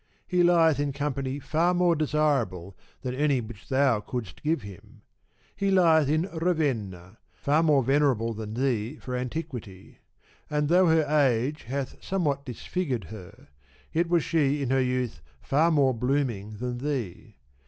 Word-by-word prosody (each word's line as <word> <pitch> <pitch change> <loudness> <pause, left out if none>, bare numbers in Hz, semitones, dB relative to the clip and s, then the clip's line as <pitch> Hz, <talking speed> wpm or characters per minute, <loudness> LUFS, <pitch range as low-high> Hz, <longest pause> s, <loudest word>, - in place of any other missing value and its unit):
He 180 -1 +1
lieth 165 -4 +4
in 145 -1 -1
company 140 -1 -2
far 160 +5 +1
more 175 -1 +3
desirable 140 - 0 0.3
than 125 -1 -3
any 140 0 +1
which 110 -3 -10
thou 130 -4 +3
couldst 110 -4 -6
give 155 -4 0
him. 105 +3 -13 0.5
He 200 - 0
lieth 165 -6 +4
in 155 +2 +2
Ravenna, 120 - -2 0.2
far 150 +3 +1
more 150 -5 +3
venerable 130 -4 +2
than 110 0 -6
thee 125 -1 -1
for 125 -3 -6
antiquity; 125 - -6 0.5
and 150 -1 0
though 180 +1 +5
her 160 -1 +4
age 145 -2 +1
hath 135 +2 -5
somewhat 150 -8 -1
disfigured 130 - -3
her, 95 -9 -12 0.4
yet 165 +1 +1
was 170 -2 +3
she 145 -3 +1
in 130 - -2
her 135 0 +3
youth 125 -8 -2 0.2
far 155 - +2
more 140 -5 +3
blooming 120 -4 -1
than 125 +1 -4
thee. 130 -10 -4
140 Hz, 150 wpm, -27 LUFS, 120-155 Hz, 0.5 s, though